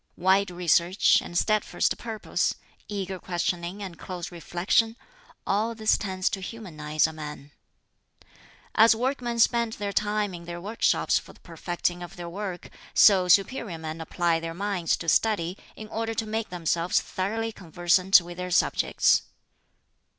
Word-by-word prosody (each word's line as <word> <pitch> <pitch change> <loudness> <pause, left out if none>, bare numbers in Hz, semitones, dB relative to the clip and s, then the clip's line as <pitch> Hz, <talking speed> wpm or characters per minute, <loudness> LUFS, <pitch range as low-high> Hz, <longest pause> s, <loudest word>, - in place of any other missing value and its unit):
"Wide 190 +2 +3
research 175 +1 +3
and 175 - -5
steadfast 215 +3 +1
purpose, 225 -2 -2 0.3
eager 195 -2 -4
questioning 175 +2 -3
and 180 -4 -8
close 180 -2 -6
reflection 180 +7 0 0.5
all 220 +4 0
this 220 -1 +3
tends 185 -2 -2
to 195 - -3
humanize 155 -8 -2
a 160 - -2
man. 150 -2 -8 1.2
"As 225 +1 +6
workmen 245 0 -2
spend 235 0 +3
their 200 -2 -4
time 210 -1 0
in 170 -1 -9
their 170 0 -6
workshops 210 +6 +1
for - - -14
the - - -22
perfecting 175 +1 -3
of 175 -1 -8
their 175 -1 -7
work, 185 0 -6 0.2
so 190 -3 +6
superior 195 0 +2
men 160 0 -6
apply 170 0 0
their 165 0 -6
minds 195 -3 0
to 165 - -8
study 180 0 +2 0.2
in 215 - -9
order 225 0 -3
to 225 - -1
make 220 +1 -3
themselves 170 0 0
thoroughly 225 +4 -3
conversant 180 +1 +3
with 175 0 -10
their 180 0 -4
subjects. 175 - +3
185 Hz, 145 wpm, -26 LUFS, 175-215 Hz, 1.2 s, As